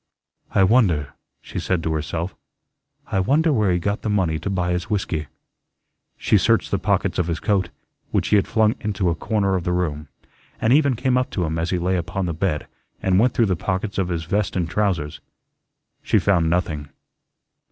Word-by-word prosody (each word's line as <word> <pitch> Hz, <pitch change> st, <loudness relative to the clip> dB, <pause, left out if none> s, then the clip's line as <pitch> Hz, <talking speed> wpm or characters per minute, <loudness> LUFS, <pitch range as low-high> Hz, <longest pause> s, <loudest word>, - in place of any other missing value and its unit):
"I 95 Hz, -, +5 dB
wonder," 95 Hz, -, +3 dB, 0.3 s
she -, -, -5 dB
said 90 Hz, -3 st, -1 dB
to 80 Hz, -, 0 dB
herself, 80 Hz, +4 st, -3 dB, 0.8 s
"I 95 Hz, -, +1 dB
wonder 150 Hz, -, +3 dB
where 105 Hz, -6 st, +2 dB
he 90 Hz, -, +2 dB
got 100 Hz, +4 st, -2 dB
the -, -, -2 dB
money 90 Hz, -6 st, +1 dB
to 100 Hz, -, -4 dB
buy 90 Hz, -2 st, 0 dB
his 90 Hz, +3 st, -2 dB
whiskey." 90 Hz, -7 st, -2 dB, 0.9 s
She -, -, +3 dB
searched -, -, +2 dB
the -, -, +1 dB
pockets -, -, 0 dB
of 85 Hz, -, +1 dB
his 85 Hz, -2 st, -2 dB
coat, 95 Hz, +1 st, +1 dB, 0.4 s
which -, -, 0 dB
he -, -, +4 dB
had 100 Hz, -, +3 dB
flung 110 Hz, -1 st, +3 dB
into 100 Hz, -5 st, 0 dB
a -, -, +1 dB
corner 100 Hz, +1 st, 0 dB
of 90 Hz, -, -1 dB
the 90 Hz, -, -1 dB
room, 75 Hz, -4 st, -2 dB, 0.5 s
and 110 Hz, +3 st, +3 dB
even 140 Hz, -3 st, +4 dB
came 125 Hz, +1 st, +1 dB
up 125 Hz, -, -2 dB
to 90 Hz, -, -1 dB
him 80 Hz, +1 st, -2 dB
as 85 Hz, +1 st, -1 dB
he 90 Hz, -, 0 dB
lay 90 Hz, +2 st, 0 dB
upon 90 Hz, +2 st, -2 dB
the 85 Hz, -, -2 dB
bed 80 Hz, -2 st, -1 dB, 0.3 s
and 95 Hz, 0 st, +2 dB
went 125 Hz, +3 st, +3 dB
through 115 Hz, -, +4 dB
the 95 Hz, -3 st, +1 dB
pockets 95 Hz, +4 st, -2 dB
of 95 Hz, -, +1 dB
his 85 Hz, -2 st, -2 dB
vest 100 Hz, +5 st, -1 dB
and 85 Hz, -3 st, -1 dB
trousers. 90 Hz, -8 st, -1 dB, 0.8 s
She -, -, +2 dB
found 85 Hz, -5 st, +2 dB
nothing. 80 Hz, -4 st, -1 dB
95 Hz, 200 wpm, -22 LUFS, 85-105 Hz, 0.9 s, I